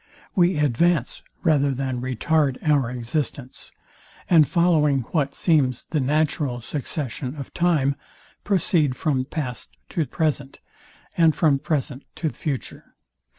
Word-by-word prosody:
We 175 -2 +3
advance, 150 +1 +1 0.2
rather 145 -3 +3
than 130 -2 -3
retard 130 +2 +1
our 140 -5 +3
existence; 125 +2 -4 0.6
and 160 -5 +6
following 150 -4 +3
what 145 -5 0
seems 140 -8 +2
the 155 - +1
natural 145 -2 0
succession 135 0 -4
of 140 -3 -8
time, 155 -6 +2 0.5
proceed 170 -8 +1
from 130 -3 0
past 125 - -5
to 160 -4 -1
present, 145 -4 -2 0.6
and 165 -2 +4
from 145 -5 +3
present 140 -2 -2
to 160 - -1
future. 140 -5 -6
145 Hz, 115 wpm, -23 LUFS, 130-160 Hz, 0.6 s, and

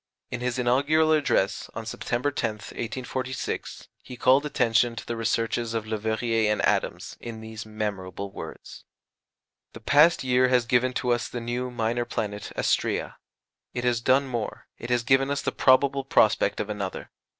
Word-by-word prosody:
In 125 - -4
his 125 0 -1
inaugural 145 +6 +3
address, 140 -10 +1
on 115 0 -5
September 120 +4 -2
10th, 110 -4 -4
1846, 130 +2 -4
he 125 - -10
called 130 +5 +4
attention 115 -3 +2
to 110 - -7
the 120 - -3
researches 115 +1 -1
of 110 -1 -2
Leverrier 110 0 0
and 105 - 0
Adams - - -1
in 115 -2 -7
these 110 -1 -8
memorable 100 -2 -4
words: - - -9 0.9
"The - - -9
past 145 +8 +4
year 130 0 +3
has 125 -2 +3
given 125 +2 +2
to 125 0 0
us 120 -2 0
the 120 - -4
new 120 +2 -3
[minor] 120 0 -1
planet 105 -3 -4
Astræa; - - 0 0.6
it 120 - -2
has 120 -2 +1
done 130 +3 +3
more 120 -4 -4
it 120 - -7
has 120 -1 +2
given 135 +3 +3
us 140 0 -1
the - - 0
probable 135 +1 +3
prospect 110 -5 +3
of - - -2
another. 100 -3 -5
120 Hz, 160 wpm, -26 LUFS, 110-130 Hz, 0.9 s, called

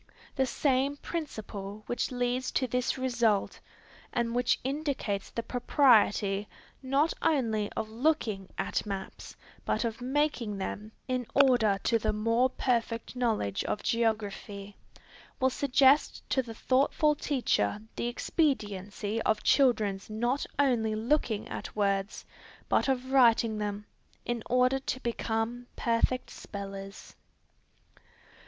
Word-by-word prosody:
The 265 -2 +1
same 275 +2 +1
principle 215 - -6
which 245 - -1
leads 245 0 -1
to 260 - +2
this 250 +2 -1
result, 240 -6 +1 0.5
and 235 -1 -1
which 245 0 +2
indicates 265 -8 -2
the 230 - -4
propriety, 215 -6 +3 0.3
not 275 +4 +2
only 225 -10 +1
of 220 - -3
looking 225 -5 0
at 195 - -1
maps 195 -2 -6 0.3
but - - 0
of 230 +1 -4
making 255 -5 0
them, 205 +2 -5 0.2
in 255 -2 -1
order 245 -7 +5
to 230 - +2
the 215 0 0
more 230 +4 +2
perfect 235 -2 -1
knowledge 220 - 0
of - - -2
geography, 205 -3 -2 0.6
will 260 0 +3
suggest 275 +2 +3
to 265 - +3
the 230 -3 -9
thoughtful 280 +5 +2
teacher 255 - 0 0.2
the - - -2
expediency 215 - -1
of 215 -1 +1
children's 215 -8 +2
not 240 +6 -1
only 240 -6 +2
looking 225 -2 0
at - - -7
words, 200 0 -1 0.4
but - - +2
of 260 0 -1
writing 230 -4 +4
them, 210 0 -3 0.4
in 240 -1 -2
order 255 +2 +3
to 260 -1 -3
become 235 +1 -2
perfect 235 +2 0
spellers. 195 -1 -8
235 Hz, 120 wpm, -29 LUFS, 210-260 Hz, 0.6 s, order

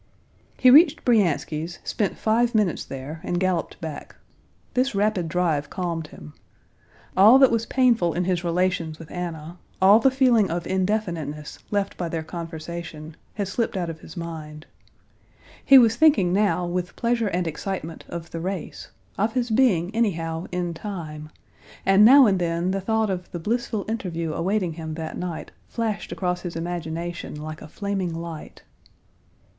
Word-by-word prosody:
He 255 - +6
reached 310 +2 +6
Bryansky's, 170 - +1
spent 205 - -2
five 230 +2 +1
minutes 210 -6 +1
there, 135 +4 -7
and 175 - -1
galloped 185 -3 -1
back. 160 -3 -7 0.6
This 255 -1 +1
rapid 200 -4 +1
drive 155 -4 0
calmed 170 -4 -3
him. 75 - -12 0.8
All 210 +7 +8
that 265 -1 +6
was 230 0 0
painful 235 - +2
in 180 - 0
his 180 -1 0
relations 170 -2 0
with 160 -2 -12
Anna, 170 -1 -6 0.2
all 195 +3 +7
the 270 - +4
feeling 250 -6 +3
of 170 +1 -3
indefiniteness 175 -6 -2
left 200 -1 -1
by 175 -2 -3
their 160 -1 -3
conversation, 165 -1 -7 0.2
had 200 -2 -2
slipped 225 +1 -2
out 175 -2 -2
of 160 - -11
his 160 - -12
mind. 155 -2 -7 1.0
He 275 - +8
was 230 -3 +6
thinking 235 - +4
now 200 -3 +2
with 175 0 -3
pleasure 235 -1 0
and 180 -2 -1
excitement 165 0 -5
of 170 0 -7
the 165 - -4
race, 185 0 -5 0.3
of 215 +3 +1
his 245 -2 -1
being 215 -7 +2
anyhow, 165 -7 -1
in 175 -1 -2
time, 160 -5 -7 0.6
and 195 +2 +6
now 265 +4 +9
and 195 -4 +2
then 170 +1 0
the 195 0 -1
thought 220 +1 0
of 180 -1 -4
the 175 - -5
blissful 225 +2 -2
interview 170 -8 -3
awaiting 185 +1 -1
him 160 -1 -6
that 160 -1 -5
night 180 -2 -5 0.2
flashed 225 -3 -3
across 180 -1 -2
his 175 -2 -6
imagination 170 -1 -4
like 155 0 -7
a - - -9
flaming 195 -1 -3
light. 165 -2 -8
180 Hz, 160 wpm, -24 LUFS, 165-215 Hz, 1.0 s, now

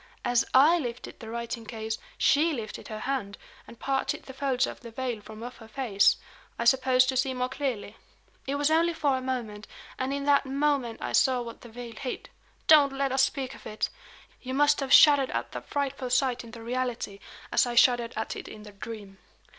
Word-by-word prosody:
As 245 -1 +3
I 305 +7 +6
lifted 240 -5 -6
the 220 - -9
writing 235 0 -4
case, 220 0 -5 0.2
she 315 +3 +3
lifted 225 -5 -6
her 215 -1 -6
hand, 245 -7 -3 0.3
and 235 - -13
parted 270 -1 -1
the 265 - -10
folds 265 -1 +1
of - - -7
the 235 - -10
veil 240 -2 -4
from 215 +2 -10
off 245 +1 -8
her 225 -1 -13
face 225 -4 +2 0.4
I 235 - -2
suppose 255 +1 +5
to 260 0 -1
see 260 0 +1
more 250 0 -1
clearly. 245 -6 -4 0.5
It 275 - -1
was 290 +2 +1
only 335 +1 +3
for 285 -4 +1
a 260 - -2
moment; 235 -5 -4 0.3
and 260 +1 -1
in 280 0 -2
that 285 -1 +3
moment 275 -4 0
I - - -3
saw 255 -2 +3
what 230 -1 -9
the 240 - -12
veil 235 0 -8
hid. 250 +3 -6 0.3
Don't 290 -3 +6
let 275 0 -1
us 265 0 +3
speak 270 -1 0
of - - -11
it! 215 - -2 0.5
You 260 0 -4
must 290 +1 +4
have 270 -2 -3
shuddered 285 -3 +7
at - - -3
that - - -7
frightful 280 -3 -2
sight 255 -1 +1
in 230 - -11
the 225 0 -10
reality, 240 -4 -3 0.3
as - - +3
I 240 - -3
shuddered 240 -1 +4
at 220 - -3
it - - -8
in 210 - -10
the 210 - -11
dream. 200 -1 -9
255 Hz, 210 wpm, -28 LUFS, 230-275 Hz, 0.5 s, shuddered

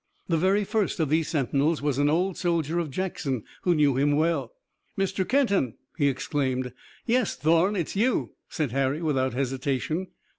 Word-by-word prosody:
The 170 - +1
very 190 +5 +2
first 205 -2 -1
of 155 -4 +1
these 160 +1 +2
sentinels 145 +1 +1
was 145 -2 -1
an 145 0 +3
old 180 +4 +1
soldier 170 -2 0
of 165 -3 -2
Jackson, 140 - -3 0.2
who 175 -2 +2
knew 145 -4 +3
him 145 +2 +3
well. 160 +2 +1 0.5
"Mr. 195 -1 -1
Kenton!" 200 - +2 0.2
he 145 -3 +2
exclaimed. 130 -2 -1 0.3
"Yes, 245 -2 +1
Thorn! 170 +6 +3
It's 175 -2 -2
you!" 235 +5 +1 0.2
said 150 -7 -2
Harry 135 +4 0
without 130 -5 0
hesitation. 135 +6 -1
155 Hz, 160 wpm, -26 LUFS, 140-185 Hz, 0.5 s, an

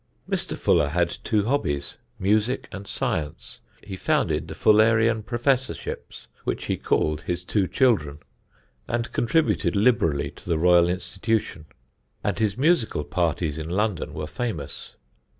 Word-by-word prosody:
Mr. - - -2
Fuller 75 - +3
had 85 +2 0
two 105 -2 +1
hobbies, 75 - -1 0.2
music 105 +6 +1
and 100 0 -8
science. 75 0 -3 0.2
He 100 -2 -6
founded - - 0
the - - -7
Fullerian 110 +1 +4
professorships 125 +4 -2 0.2
(which - - -3
he - - 0
called 75 0 0
his 90 +1 -3
two 100 -1 +1
children), 85 - +2 0.7
and 120 0 -2
contributed 155 -1 +1
liberally 100 - +2
to - - -13
the 85 - +2
Royal 85 +1 +5
Institution; 95 -1 -2 0.6
and - - -1
his 105 -1 0
musical 135 - +2
parties 80 -1 -1
in 80 +1 -5
London 100 -4 -1
were 75 -1 -3
famous. 75 - -5
95 Hz, 130 wpm, -25 LUFS, 80-115 Hz, 0.7 s, Royal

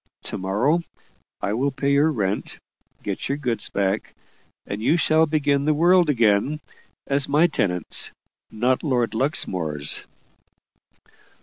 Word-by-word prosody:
To - - -4
morrow 110 - +1 0.6
I 100 - -1
will 130 +5 0
pay 140 +1 -1
your 145 +3 +4
rent 100 -6 -2 0.5
get - - -4
your 140 - -1
goods 120 -7 -2
back 100 +1 -2 0.5
and 100 +1 -5
you 155 +9 +3
shall 160 -1 +3
begin 145 -2 +1
the 155 0 +2
world 175 +1 +4
again, 120 +3 +2 0.5
as 140 0 +1
my 150 +4 +4
tenants, 90 - +1 0.4
not 125 +4 0
Lord 125 -6 0
Luxmore's." 90 - -1
135 Hz, 125 wpm, -23 LUFS, 105-150 Hz, 0.6 s, your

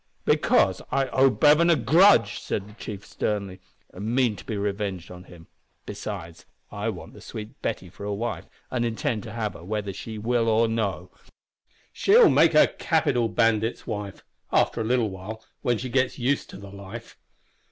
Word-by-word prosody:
"Because - - +3
I 135 -1 +1
owe 135 +2 +4
Bevan 150 +5 +4
a 170 - +6
grudge!" 135 - +4
said 100 -1 -4
the 105 - -14
chief, 105 -2 -8
sternly, 100 -3 -3 0.3
"and 105 +6 -3
mean 125 -5 +2
to - - -11
be 110 - -4
revenged 100 -3 -3
on 90 0 -11
him. 85 -2 -14 0.4
Besides, 80 0 -7 0.2
I - - -3
want - - -8
the - - -13
sweet 105 0 -9
Betty 90 - -3
for 95 +3 -12
a 105 - -3
wife, 115 +4 -4 0.2
and 125 -2 0
intend 115 0 -1
to 110 - -9
have 110 -2 -3
her, 85 - -12
whether 100 +1 -3
she 110 +3 -7
will 115 +1 +1
or 115 +1 +3
no. 100 -5 -2 0.8
She'll 460 +5 +6
make - - +4
a - - +8
capital 130 -8 +1
bandit's 115 0 +1
wife 105 -3 -5 0.3
after - - +2
a - - -2
little 120 -3 +1
while, 105 +4 -8 0.2
when 120 -4 +1
she 130 - -5
gets 130 0 0
used 135 +3 0
to - - -10
the 100 0 -11
life. 100 +4 -10
110 Hz, 180 wpm, -25 LUFS, 100-120 Hz, 0.8 s, a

